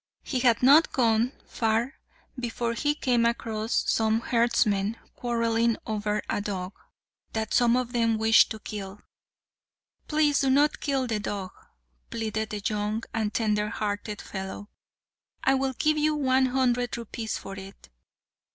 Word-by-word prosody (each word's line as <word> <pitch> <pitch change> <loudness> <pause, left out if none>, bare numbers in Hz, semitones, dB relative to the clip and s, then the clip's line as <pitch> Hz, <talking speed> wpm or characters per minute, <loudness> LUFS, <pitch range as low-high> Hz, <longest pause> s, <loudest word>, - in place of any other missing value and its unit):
He 260 - -2
had 240 -2 +3
not 290 +5 +6
gone 230 -1 +2
far 225 +3 -1 0.4
before 235 -1 -2
he 290 +5 0
came 245 -5 +1
across 225 -1 0
some 220 0 +2
herdsmen 230 -3 +1 0.2
quarrelling 230 -1 +1
over 210 -1 -2
a - - -1
dog, 195 -2 -4 0.6
that 220 -1 -2
some 240 0 +4
of 250 -1 -2
them 230 -2 +2
wished 220 +1 +5
to 220 - -5
kill. 205 -2 -7 1.1
"Please 300 -2 +2
do 270 - +2
not 285 +3 +3
kill 270 -3 0
the 225 -3 -1
dog," 200 -2 -4 0.6
pleaded 220 -1 -3
the 210 -1 -5
young 210 +1 -1
and 220 -2 -1
tender 210 -1 0
hearted 210 -1 -4
fellow; 190 +1 -7 0.7
"I 270 - +4
will 265 0 0
give 305 +4 +1
you 305 0 +2
one 260 -2 +2
hundred 245 -2 0
rupees 230 -1 -4
for 195 - -8
it." 195 - -12
230 Hz, 140 wpm, -27 LUFS, 210-250 Hz, 1.1 s, not